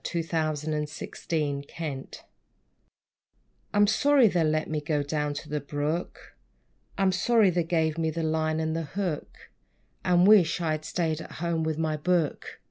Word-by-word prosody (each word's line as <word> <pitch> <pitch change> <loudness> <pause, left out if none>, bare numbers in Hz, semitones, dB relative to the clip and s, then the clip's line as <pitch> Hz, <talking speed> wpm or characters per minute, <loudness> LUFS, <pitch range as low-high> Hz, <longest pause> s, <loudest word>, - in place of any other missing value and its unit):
=The 170 -2 -2
Dissatisfied 155 -2 -3
Angler 145 -3 -1
Boy= 145 -5 -4 1.6
I'm 205 0 +4
sorry 270 +4 +4
they 175 -3 +1
let 155 0 +1
me 155 -1 -2
go 150 -1 0
down 150 0 -2
to 145 - -6
the 150 0 -2
brook; 145 +5 -4 0.6
I'm 195 -1 +3
sorry 210 +2 +3
they 175 0 +1
gave 160 -1 0
me 160 -1 +1
the 165 +1 -3
line 155 0 0
and 160 0 -1
the 165 - -1 0.2
hook; 180 -7 -4 0.5
And 180 0 +4
wish 200 -6 +5
I 165 -2 0
had 155 0 -3
staid 160 -1 -1
at - - -10
home 170 0 -2
with 160 -1 -1
my 160 -1 -1
book! 170 -1 -1
160 Hz, 160 wpm, -27 LUFS, 150-175 Hz, 1.6 s, wish